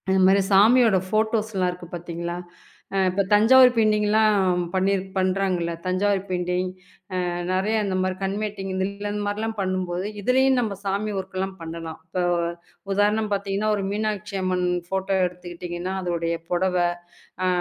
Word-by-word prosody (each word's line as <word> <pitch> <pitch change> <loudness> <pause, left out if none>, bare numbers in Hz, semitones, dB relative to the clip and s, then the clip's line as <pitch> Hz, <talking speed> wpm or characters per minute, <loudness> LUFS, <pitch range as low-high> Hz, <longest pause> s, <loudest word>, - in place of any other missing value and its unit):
இந்த 190 0 +3
மாரி 195 +1 +5
சாமியோட 220 +2 +6
போட்டோஸ்லாம் 215 -3 +1
இருக்கு 180 -1 -10
பாத்தீங்களா? 170 0 -5 0.6
அ - - +1
இப்போ 195 +2 +1
தஞ்சாவூர் 250 +5 +7
பெயிண்டிங்லாம் 210 -4 +3
பண்ணிரு 190 0 +1
பண்றாங்கள்ல. 185 -2 0
தஞ்சாவூர் 190 +2 +1
பெயிண்டிங். 180 0 -1 0.6
அ - - -1 0.2
நிறைய 195 +4 +1
இந்த 195 -2 -2
மாரி 185 0 0
கண் 195 +1 -1
மேட்டிங் 200 -2 -4
இந்த 190 0 0 0.3
இந்த 210 0 -3
மாரிலாம் 220 +2 -2
பண்ணும் 185 -1 -1
போது, 175 +2 -2 0.2
இதுலயும் 260 +4 +3
நம்ப 220 -4 -2
சாமி 200 +2 -1
வோர்க்லாம் 190 0 -4
பண்ணலாம். 165 0 -7
இப்போ 180 0 -2 0.7
உதாரணம் 210 +2 +2
பாத்தீங்கன்னா, 200 +1 0
ஒரு 200 - -2
மீனாட்சி 210 -1 -2
அம்மன் 185 -1 0 0.3
போட்டோ 190 0 -1
எடுத்துக்கிட்டீங்கன்னா, 175 0 -6
அதோடைய 170 -1 -1
புடவை, 180 0 +2 0.6
அ - - +2
190 Hz, 140 wpm, -24 LUFS, 180-210 Hz, 0.7 s, தஞ்சாவூர்